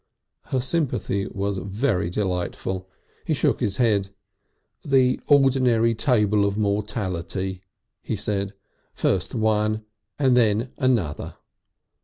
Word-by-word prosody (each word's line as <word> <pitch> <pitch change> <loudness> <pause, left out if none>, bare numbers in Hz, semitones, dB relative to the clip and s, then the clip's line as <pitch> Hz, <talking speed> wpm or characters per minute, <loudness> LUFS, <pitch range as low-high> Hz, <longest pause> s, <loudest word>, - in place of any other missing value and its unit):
Her 130 - -1
sympathy 130 - 0
was 100 0 -2
very 100 -2 -1
delightful. 95 0 -2 0.3
He - - 0
shook - - +1
his 100 -1 -1
head. 105 -6 +2 0.7
"The 130 -2 +3
ordinary 130 -5 +4
table 105 -4 +2
of 100 0 0
mortality," 95 -3 -2 0.4
he - - -3
said. 100 -1 -2 0.4
"First 95 +5 0
one 110 -1 +1 0.3
and 130 -3 +3
then 115 +1 +2
another." 115 - 0
105 Hz, 105 wpm, -24 LUFS, 95-125 Hz, 0.7 s, ordinary